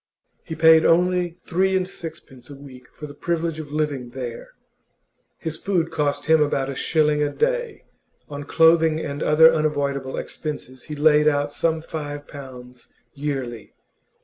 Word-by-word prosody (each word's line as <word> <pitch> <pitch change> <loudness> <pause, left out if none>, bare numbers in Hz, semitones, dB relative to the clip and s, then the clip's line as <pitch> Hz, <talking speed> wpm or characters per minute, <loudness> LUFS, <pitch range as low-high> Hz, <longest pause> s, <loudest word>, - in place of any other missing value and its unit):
He 160 - -6
paid 160 0 +6
only 180 0 +2
three 190 +2 +1
and 185 -1 -2
sixpence 155 -8 -10
a 140 - -9
week 130 -3 -13
for 150 - -10
the 145 - -10
privilege 165 +1 -2
of 150 -2 -8
living 145 -5 -2
there; 120 -2 -7 0.8
his 160 -1 -5
food 175 -4 -1
cost 145 -1 -1
him 160 0 +4
about 140 -2 0
a - - -7
shilling 150 0 +1
a 145 - +1
day; 485 -2 -1 0.4
on 145 -1 -7
clothing 160 0 +4
and 145 -1 -5
other 160 +2 +6
unavoidable 140 -4 -1
expenses 130 -5 -6
he 150 - -6
laid 150 0 +4
out 145 -1 +1
some 160 -1 0
five 145 -2 -6
pounds 125 -3 -11 0.2
yearly. 135 -6 -5
150 Hz, 150 wpm, -22 LUFS, 140-160 Hz, 0.8 s, paid